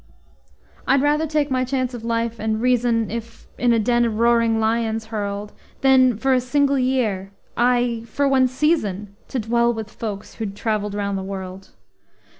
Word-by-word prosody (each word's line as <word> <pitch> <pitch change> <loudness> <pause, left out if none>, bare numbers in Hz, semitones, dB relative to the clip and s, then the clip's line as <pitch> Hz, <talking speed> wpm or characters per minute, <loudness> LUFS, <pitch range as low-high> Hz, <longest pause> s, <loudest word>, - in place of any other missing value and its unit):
I'd 270 +1 +3
rather 300 +2 +2
take 295 -2 0
my 255 -1 +1
chance 255 -1 -2
of 235 -2 -7
life 230 0 -2
and 220 0 -1
reason, 240 -2 +1
If 230 0 -7
in 245 -1 +3
a 230 - +4
den 240 +2 +2
of 225 -2 -1
roaring 230 -1 +3
lions 225 0 0
hurled 205 0 -4 0.3
Than 260 -3 +5
for 265 +4 +1
a 255 - +3
single 280 +2 +1
year, 225 -7 0 0.2
ay, 240 -1 +2
for 280 +5 0
one 265 -1 +4
season, 215 - -1
To - - -4
dwell 235 +1 +2
with 220 -2 -6
folks 210 -3 -6
who'd 205 -3 -4
traveled 210 -1 -2
round 200 -1 -2
the - - -5
world. 190 0 -7
230 Hz, 170 wpm, -22 LUFS, 215-255 Hz, 0.3 s, Than